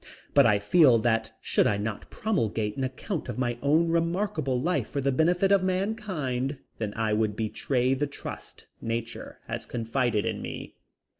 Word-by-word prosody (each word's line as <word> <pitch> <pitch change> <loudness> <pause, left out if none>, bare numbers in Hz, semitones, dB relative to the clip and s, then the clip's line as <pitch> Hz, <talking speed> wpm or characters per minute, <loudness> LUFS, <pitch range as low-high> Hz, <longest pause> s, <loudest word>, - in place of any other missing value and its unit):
But 140 -4 +7
I 105 -2 +4
feel 125 - +5
that 115 0 +1
should - - +2
I 100 - +1
not 105 +1 -4
promulgate 110 - -1
an 135 - -2
account 140 +7 -4
of - - -4
my 120 -2 -1
own 155 +4 +3
remarkable 170 -5 0
life 175 +7 0
for 140 - -2
the 140 0 +1
benefit 175 +7 +3
of 200 -2 +5
mankind 185 - -1 0.2
then 105 -2 -2
I 110 -2 0
would 105 -1 +1
betray 125 +4 0
the 145 +2 0
trust 140 - -9 0.2
nature 115 0 -4
has - - -5
confided 115 -2 0
in - - -2
me. - - -6
130 Hz, 165 wpm, -27 LUFS, 115-170 Hz, 0.2 s, But